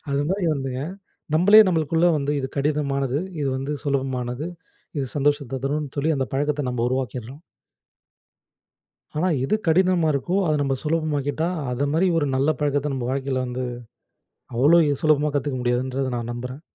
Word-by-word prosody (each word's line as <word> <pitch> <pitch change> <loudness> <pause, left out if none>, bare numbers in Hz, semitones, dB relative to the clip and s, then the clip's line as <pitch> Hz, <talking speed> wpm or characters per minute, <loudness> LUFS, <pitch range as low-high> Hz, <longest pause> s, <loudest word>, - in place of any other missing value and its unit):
அது 140 +1 +1
மாரி 190 -1 0
வந்துங்க, 135 -2 -3 0.5
நம்மளே 200 +7 +8
நம்மளுக்குள்ள 165 -1 +1
வந்து 140 0 -1
இது 130 - -2
கடினமானது, 140 -2 0 0.2
இது 140 - 0
வந்து 135 +3 -3
சுலபமானது, 130 -1 -2 0.5
இது 135 - -1
சந்தோஷத்த 145 -2 0
தருன்னு 145 0 -2
சொல்லி 155 +3 +2
அந்த 135 -1 -1
பழக்கத்த 145 -1 0
நம்ம 120 -1 -1
உருவாக்கிறோம். 130 +1 -4 1.8
ஆனா, 175 +4 +1 0.2
எது 135 - +2
கடினமா 180 0 +3
இருக்கோ 140 +7 -1
அத 155 - +2
நம்ம 135 -1 +1
சுலபமாக்கிட்டா, 155 -1 -1 0.2
அத 130 +3 0
மாரி 175 +4 +3
ஒரு 155 - +2
நல்ல 135 +3 +2
பழக்கத்த 145 0 0
நம்ம 125 -2 -3
வாழ்க்கையில 135 -1 -1
வந்து 125 +1 -4 0.9
அவ்ளோ 150 +8 +6 0.2
சுலபமா 150 -1 +3
கத்துக்க 140 -2 -1
முடியாதுன்றத 130 +2 0
நான் 120 0 -4
நம்புறன். 125 +3 -6
140 Hz, 145 wpm, -23 LUFS, 130-150 Hz, 1.8 s, நம்மளே